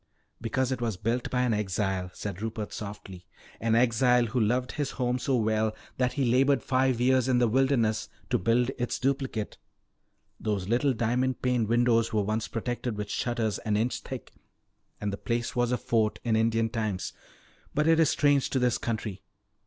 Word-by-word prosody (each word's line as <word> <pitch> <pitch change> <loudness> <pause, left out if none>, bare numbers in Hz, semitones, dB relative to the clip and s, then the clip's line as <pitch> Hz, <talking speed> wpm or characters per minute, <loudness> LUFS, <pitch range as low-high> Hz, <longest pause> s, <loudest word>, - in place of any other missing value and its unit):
"Because 130 +3 0
it 130 -2 -2
was 115 -5 -1
built 115 +5 -1
by 125 0 +1
an 120 -2 +2
exile," 95 -2 -1
said 100 -2 -5
Rupert 110 -1 -4
softly. 95 -3 -8 0.3
"An 115 0 +1
exile 125 +1 +4
who 120 +2 -1
loved 125 +3 +1
his 145 -3 -2
home 125 -1 -1
so 130 +1 0
well 110 -1 +1 0.2
that 125 -1 +1
he 140 - 0
labored 130 +1 +3
five 130 -2 +1
years 130 0 +3
in 130 -1 +3
the 120 -1 +4
wilderness 120 -3 +1 0.2
to - - +3
build 120 +6 +2
its 120 - -1
duplicate. 130 -5 -2 0.8
Those 100 -4 -2
little 125 +5 +2
diamond 125 +3 0
paned 125 -3 +1
windows 115 0 +3
were 105 -3 +1
once 110 +2 -1
protected 120 -1 -3
with 105 0 -4
shutters 115 -4 -1
an 105 -1 0
inch 115 +4 0
thick, - - -8 0.7
and 105 -1 -2
the - - -3
place 120 +2 -2
was 120 0 +1
a 125 - +2
fort 110 -2 +1
in 115 -2 +1
Indian 115 0 +2
times. 110 -5 -3 0.6
But 150 +1 +2
it 165 0 +5
is 160 - +5
strange 145 -2 +3
to - - -1
this 125 -2 +2
country. 110 -4 -3
120 Hz, 180 wpm, -28 LUFS, 110-125 Hz, 0.8 s, it